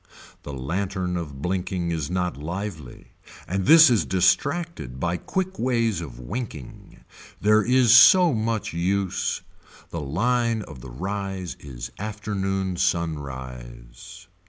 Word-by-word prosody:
The 70 - -8
lantern 90 +6 -2
of 75 -5 -6
blinking 90 -1 -2
is 80 -3 -2
not 90 0 -1
lively 80 -2 -7 0.4
and 95 +1 -2
this 160 0 +9
is 115 - +3
distracted 95 - 0
by 85 +4 0
quick 190 - -3
ways 115 -6 +1
of 65 -8 -8
winking. 75 - -7 0.4
There 105 +1 +4
is 125 +1 +5
so 175 +5 +8
much 110 -3 -2
use. 95 +3 -1 0.5
The 85 - -4
line 115 - 0
of 65 - -11
the 65 - -9
rise 95 +4 -4
is 65 -4 -8
afternoon 95 -3 -3
sunrise. 65 -2 -4
95 Hz, 120 wpm, -24 LUFS, 75-110 Hz, 0.5 s, this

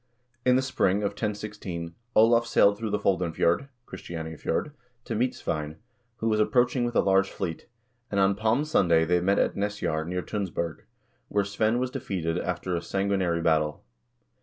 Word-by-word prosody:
In 125 0 +4
the 130 - +2
spring 105 -6 +1
of 100 - 0
1016 105 -6 -5 0.2
Olav 115 +2 +5
sailed 100 -3 +4
through 110 +1 -4
the 105 - +1
Foldenfjord 90 +4 +1 0.2
(Christianiafjord) 80 - -4 0.3
to - - -3
meet 125 +3 0
Svein, 75 0 -4 0.4
who 115 -1 -3
was 110 -1 +2
approaching 120 +3 +2
with 120 - -3
a - - +5
large 95 0 +3
fleet, 85 -4 -5 0.4
and 100 - 0
on 95 0 +4
Palm 110 +7 +1
Sunday 85 - +3
they 90 +1 +2
met 100 +3 +2
at - - +1
Nesjar, 100 -6 -2
near 90 0 -2
Tunsberg, 95 -3 -4 0.4
where 100 -1 0
Svein 110 +3 +1
was 125 0 -1
defeated 90 - -2
after 90 0 -2
a - - 0
sangui 100 +2 -1
nary 85 -2 0
battle. 75 -2 +1
100 Hz, 165 wpm, -27 LUFS, 85-110 Hz, 0.4 s, Olav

